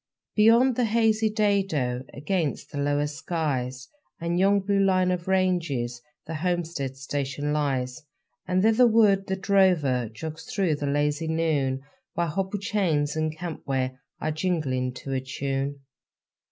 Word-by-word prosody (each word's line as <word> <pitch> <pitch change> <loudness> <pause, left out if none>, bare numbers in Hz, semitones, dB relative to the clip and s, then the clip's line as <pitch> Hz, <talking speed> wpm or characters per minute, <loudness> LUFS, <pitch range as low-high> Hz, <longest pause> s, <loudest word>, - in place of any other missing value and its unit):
Beyond 230 +4 +5
the 250 - +3
hazy 220 -1 +2
dado 195 - +1
Against 155 +1 -2
the 145 - -4
lower 145 +1 +1
skies 145 -5 -3 0.3
And 170 +1 -1
yon 200 +1 +4
blue 200 +1 +1
line 185 -1 +3
of 180 -1 -3
ranges 165 -11 0 0.2
The 165 - -6
homestead 160 -5 -2
station 140 +1 -2
lies. 130 -4 -1 0.5
And 185 +1 +2
thitherward 220 -3 +4
the 190 - 0
drover 180 - +2
Jogs 160 +8 -7
through 180 -7 0
the 145 - -3
lazy 145 +2 0
noon, 150 -5 0 0.3
While 170 0 0
hobble 195 +5 -2
chains 175 -8 0
and 155 0 -1
camp 170 -1 -5
ware 130 -1 -1 0.2
Are 155 - -1
jingling 150 -7 -1
to 135 +1 -5
a 130 - 0
tune. 135 +1 -3
160 Hz, 140 wpm, -26 LUFS, 140-190 Hz, 0.5 s, Beyond